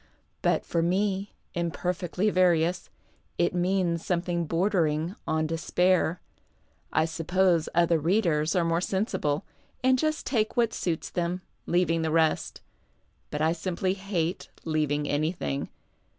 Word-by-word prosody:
But - - +1
for 170 - 0
me, 195 +3 0 0.2
imperfectly 175 +3 -1
various, 180 -1 +2 0.5
it 175 - +2
means 180 -2 +1
something 175 -1 -1
bordering 165 -1 +1
on 160 0 +1
despair. 175 +2 +1 0.7
I 155 - +3
suppose 170 +1 +1
other 170 -1 +4
readers 165 -2 +1
are 175 -2 +2
more 165 +1 +1
sensible, 185 -7 -1 0.4
and 260 0 +4
just 310 +1 0
take 220 -4 0
what 235 -2 +3
suits 165 -3 -2
them, 175 +1 -2 0.2
leaving 170 -2 +2
the 160 - 0
rest. 160 0 +1 0.7
But 150 +1 -2
I 160 - +3
simply 185 +2 -1
hate 190 -3 -2 0.2
leaving 150 -2 0
anything. 145 - -1
175 Hz, 120 wpm, -27 LUFS, 160-185 Hz, 0.7 s, other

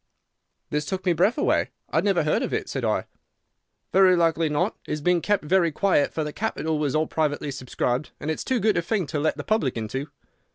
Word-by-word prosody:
"This 150 0 -1
took 190 0 -3
my 180 - +3
breath 210 - +2
away. - - +1 0.2
'I - - +3
never 195 -5 +2
heard 150 - +1
of - - -1
it,' - - -3
said - - -4
I. - - 0 0.9
"'Very 185 0 +6
likely 165 -2 +2
not. 150 0 0
It - - -2
has 150 - -2
been 180 +2 +2
kept 205 -1 +1
very 170 +1 +3
quiet, 170 -3 +2
for 160 - -2
the 150 -1 -5
capital 160 -8 -2
was 150 -1 0
all 155 +1 +2
privately 150 -2 -1
subscribed, 130 +1 -2
and 155 - -2
it's 160 - -3
too 260 -2 0
good 215 0 +2
a - - +3
thing 190 +1 -1
to 150 0 -3
let 155 +2 0
the - - -5
public 180 - 0
into. 130 +6 -4
160 Hz, 220 wpm, -25 LUFS, 150-190 Hz, 0.9 s, Very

